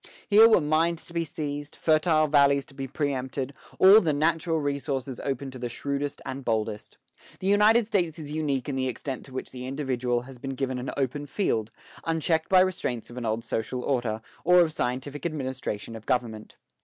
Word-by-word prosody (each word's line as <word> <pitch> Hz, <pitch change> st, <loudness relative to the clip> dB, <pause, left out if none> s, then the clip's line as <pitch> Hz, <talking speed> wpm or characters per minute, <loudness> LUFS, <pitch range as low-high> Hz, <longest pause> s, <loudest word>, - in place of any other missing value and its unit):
Here 220 Hz, +2 st, +8 dB
were 220 Hz, -, +5 dB
mines 160 Hz, +3 st, +1 dB
to 170 Hz, -, -10 dB
be 170 Hz, -1 st, 0 dB
seized, 145 Hz, -3 st, -5 dB
fertile 155 Hz, 0 st, +3 dB
valleys 140 Hz, -2 st, +4 dB
to -, -, -14 dB
be 135 Hz, 0 st, -5 dB
preëmpted, 135 Hz, -2 st, -2 dB, 0.3 s
all 195 Hz, +4 st, +8 dB
the 160 Hz, -4 st, +1 dB
natural 160 Hz, +2 st, +1 dB
resources 140 Hz, -3 st, -3 dB
open 135 Hz, 0 st, -3 dB
to 130 Hz, -, -9 dB
the 120 Hz, 0 st, -3 dB
shrewdest 140 Hz, +3 st, -3 dB
and 130 Hz, +1 st, -4 dB
the -, -, -11 dB
boldest. 110 Hz, -3 st, -2 dB, 0.4 s
The -, -, -7 dB
United 210 Hz, +3 st, +5 dB
States 175 Hz, -7 st, 0 dB
is 150 Hz, -3 st, -7 dB
unique 145 Hz, -4 st, -1 dB
in 140 Hz, -, -2 dB
the 130 Hz, -1 st, 0 dB
extent 130 Hz, +2 st, -5 dB
to 135 Hz, -, -14 dB
which 130 Hz, -, -6 dB
the 125 Hz, 0 st, -7 dB
individual 130 Hz, -3 st, -1 dB
has 130 Hz, 0 st, -12 dB
been 135 Hz, +1 st, -5 dB
given 130 Hz, -1 st, -2 dB
an 125 Hz, -, -4 dB
open 140 Hz, +2 st, -2 dB
field, 115 Hz, -, -1 dB, 0.3 s
unchecked 160 Hz, 0 st, 0 dB
by 185 Hz, -1 st, +7 dB
restraints 150 Hz, -12 st, -1 dB
of 120 Hz, -, -10 dB
an 120 Hz, -2 st, -3 dB
old 110 Hz, +1 st, -1 dB
social 125 Hz, +3 st, -3 dB
order, 120 Hz, -5 st, -1 dB, 0.2 s
or 180 Hz, +1 st, +6 dB
of 160 Hz, -2 st, +1 dB
scientific 130 Hz, +2 st, -3 dB
administration 130 Hz, -8 st, -4 dB
of 110 Hz, -, -11 dB
government. 115 Hz, -4 st, -2 dB
140 Hz, 195 wpm, -27 LUFS, 125-160 Hz, 0.4 s, Here